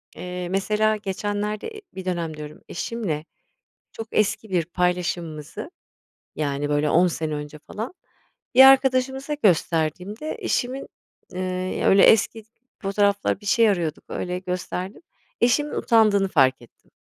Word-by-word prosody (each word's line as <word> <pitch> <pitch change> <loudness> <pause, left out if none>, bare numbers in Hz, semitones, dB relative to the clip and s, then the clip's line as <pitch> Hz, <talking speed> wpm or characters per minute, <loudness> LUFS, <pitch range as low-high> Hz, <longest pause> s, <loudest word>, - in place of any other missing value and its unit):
eee, 180 -1 -5
mesela 210 +3 +1
geçenlerde, 205 +1 -3
e 435 -2 -9
bir 190 -1 -7
dönem 170 -4 -3
diyorum, 150 0 -9
eşimle 175 -7 -3 0.7
çok 225 - -7
eski 215 0 0
bir 175 -3 +1
paylaşımımızı, 175 - -2 0.7
yani, 145 -1 -2
böyle, 150 +1 +1
10 160 -2 +2
önce 150 0 -6
falan, 220 - -7 0.6
bir 260 - +10
arkadaşımıza 265 +1 +4
gösterdiğimde 180 - 0
eşimin, 255 +2 -2 0.5
ııı, 185 0 -3
öyle, 195 0 +6
eski 225 0 +4 0.4
fotoğraflar, 200 0 +1
bir - - -13
şey 225 +2 +4
arıyorduk 170 -6 -1
öyle 180 0 -3
gösterdim. 185 +1 -5 0.4
Eşimin 290 +5 +2
utandığını 215 -4 +3
fark 130 -7 +3
ettim. 120 - -21
190 Hz, 120 wpm, -23 LUFS, 165-215 Hz, 0.7 s, bir